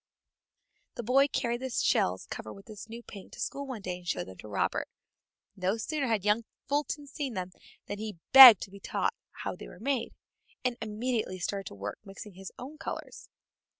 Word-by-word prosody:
This 240 - -5
boy 270 +4 +5
carried 240 -3 -1
the 260 - -3
shells 95 - +1
covered 110 - -7
with 195 - -14
his 215 0 -10
new 235 +1 -8
paint 200 -4 -11
to - - -11
school 280 0 -3
one 240 -6 -6
day 180 -1 -3
and 180 -1 -15
showed - - -1
them 95 -1 -11
to - - -10
Robert. 105 - -1 0.7
No 190 +2 0
sooner 285 +4 -2
had 220 -4 0
young 210 +2 +3 0.2
Fulton 290 0 -1
seen 275 -3 -4
them 185 -1 -3 0.3
than 205 - -5
he 215 -4 -5
begged 260 -7 +12
to 190 - -9
be 200 - -11
taught - - -1 0.2
how - - -5
they - - -10
were - - -13
made, 255 0 -1 0.5
and 250 -1 +1
immediately 220 -2 -2
started 195 +2 -3
to - - -8
work 100 +1 -6
mixing 195 +1 -10
his 190 +1 -9
own 285 +5 -9
colors. - - -7
215 Hz, 195 wpm, -30 LUFS, 190-255 Hz, 0.7 s, begged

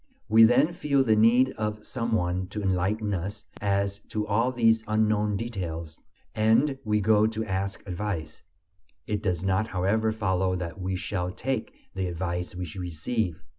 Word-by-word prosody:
We 110 +1 +7
then 125 +8 +4
feel 140 -5 +2
the 110 -4 +3
need 120 +4 +5
of 105 0 -3
some 115 -2 -3
one 90 -2 0
to 105 +3 -5
enlighten 100 +3 0
us 100 +4 -4 0.2
as 100 0 0
to 105 -1 -2
all 115 +5 +1
these 115 -2 +3
unknown 105 -1 +1
details, 85 -8 -5 0.3
and 115 +6 +3
we 105 -2 +1
go 105 +1 +4
to 110 0 -3
ask 95 0 -3
advice. 90 -5 -4 0.6
It 105 -1 -2
does 90 -4 -1
not, 95 +3 +1
however, 105 +4 +1
follow 95 -4 0
that 90 +1 -5
we 95 +1 -2
shall 90 -1 -2
take 130 +3 -3 0.2
the 95 -1 -2
advice 90 +1 -3
we 90 0 -4
receive. 90 +2 -2
105 Hz, 160 wpm, -27 LUFS, 90-110 Hz, 0.6 s, We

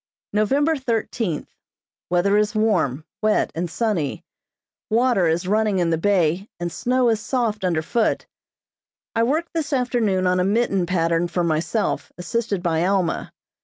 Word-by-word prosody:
November 275 +10 +2
thirteenth: 225 - -2 0.6
Weather 180 +3 +2
is 210 +1 +1
warm, 160 - +1 0.2
wet, 215 0 +2
and 170 +1 -3
sunny. 180 - -1 0.7
Water 230 -5 +3
is 165 +3 0
running 210 0 +2
in 170 -2 +1
the 165 - +2
bay 185 0 +1
and 175 0 -3
snow 250 +5 +1
is 225 -2 +1
soft 220 -3 -1
under 170 -4 +1
foot. 230 +6 0 0.9
I 225 - +2
worked 305 +8 0
this 320 -2 -2
afternoon 240 -8 +1
on 180 0 +2
a - - +3
mitten 195 -3 +1
pattern 165 -1 +1
for 175 0 -1
myself, 165 +6 -1
assisted 200 +1 -2
by 165 -2 +1
Alma. 190 -2 0
200 Hz, 145 wpm, -22 LUFS, 175-230 Hz, 0.9 s, Water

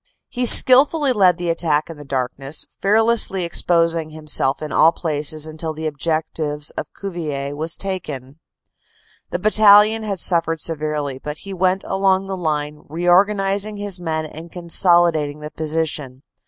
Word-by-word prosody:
He 245 -1 -2
skilfully 275 +3 +6
led 190 -5 +3
the 175 -1 -2
attack 155 -3 0
in 165 - -9
the 145 - -12
darkness, 135 +1 -2 0.2
fearlessly 215 -2 +3
exposing 165 -1 0
himself 155 -3 0
in 155 - -7
all 160 - +4
phases 155 -2 -2
until 155 0 -5
the 160 +1 -6
objective 155 -1 -3
of - - -5
Cuvillers 150 -7 -5
was 160 +3 -4
taken. 150 -8 -6 0.9
The - - -3
battalion 215 +2 +5
had 200 -3 -4
suffered 165 -2 +2
severely, 150 -4 -3
but 150 0 -6
he 195 0 -8
went 185 +1 0
along 195 0 0
the 195 0 -5
line, 150 -3 -3
reorganizing 195 +5 +1
his 200 -3 -3
men 160 -2 -3
and 160 +2 -11
consolidating 170 -4 +2
the 150 0 -9
position. 150 -4 -4
165 Hz, 140 wpm, -19 LUFS, 150-195 Hz, 0.9 s, skilfully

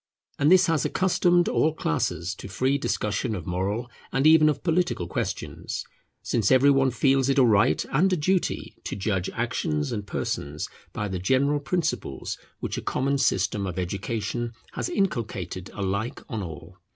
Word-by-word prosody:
And 145 +3 +4
this 185 0 +7
has 165 -4 +1
accustomed 180 -1 +2
all 155 0 +2
classes 95 - -1
to 95 - -9
free 130 +9 0
discussion 105 -1 -1
of 85 -5 -6
moral 95 +7 -2 0.2
and 135 +2 +1
even 155 -1 +7
of 140 -2 -2
political 175 - +1
questions; - - -4 0.4
since 110 -4 +1
every 130 +2 +6
one 135 -1 +4
feels 135 +2 +2
it 135 - +2
a 135 - +7
right 100 -9 +3
and 180 +8 +3
a 185 - +2
duty 185 +4 0
to - - -3
judge 95 -2 -1
actions 80 - -1
and 105 -3 -4
persons 75 -5 -3 0.2
by 105 - -3
the 95 -2 -3
general 135 +9 +2
principles 155 - -2 0.2
which - - -3
a - - -7
common 140 +1 0
system 100 -5 +1
of 90 0 -5
education 105 +5 -3 0.2
has - - -3
inculcated 115 - -2
alike 100 +3 -2
on 110 -3 -4
all. 85 +1 -8
120 Hz, 165 wpm, -26 LUFS, 95-150 Hz, 0.4 s, this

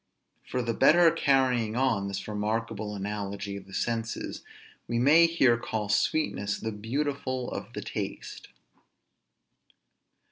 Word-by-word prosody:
For 125 - -2
the 115 0 -1
better 165 +7 +6
carrying 130 -7 +2
on 120 -6 +1
this 100 0 -5
remarkable 105 0 -2
analogy 100 0 -4
of 100 -1 -9
the 95 - -14
senses, 115 +1 -3 0.5
we 120 - -1
may 150 +7 +6
here 135 -8 +3
call 110 -3 -3
sweetness 100 -4 0
the 110 - -3
beautiful 130 +3 -3
of - - -6
the - - -5
taste. - - -6
115 Hz, 120 wpm, -28 LUFS, 105-130 Hz, 0.5 s, better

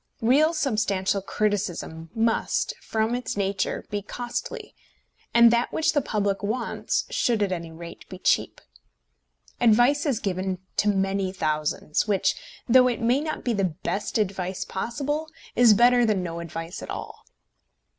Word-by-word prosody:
Real 285 +7 +4
substantial 210 - 0
criticism 190 -6 -2
must, 225 0 +1
from 220 +1 -1
its 245 -4 -3
nature, 195 -1 -1
be 205 0 -1
costly, 240 +4 -5 0.6
and 235 0 +7
that 235 +1 +1
which 315 - +1
the 290 - +2
public 205 -5 -1
wants 225 +4 -1
should 230 -4 +1
at 195 - -1
any 170 -2 -4
rate 170 +1 -11
be - - -8
cheap. - - +1 1.0
Advice 245 +6 +4
is 255 -6 +1
given 190 -2 -2 0.2
to 210 - +3
many 195 -1 0
thousands, 155 0 -1
which, 200 -3 +2 0.3
though 255 +1 +6
it 245 - -1
may 240 +4 +2
not 310 0 -4
be 240 - 0
the 190 -6 -1
best 205 +3 -2
advice 190 -2 -2
possible, 290 +10 -3 0.3
is 235 -3 +7
better 245 +2 +5
than 210 -5 +1
no 170 -1 -4
advice 165 0 -6
at - - -8
all. - - -7
210 Hz, 145 wpm, -25 LUFS, 190-240 Hz, 1.0 s, and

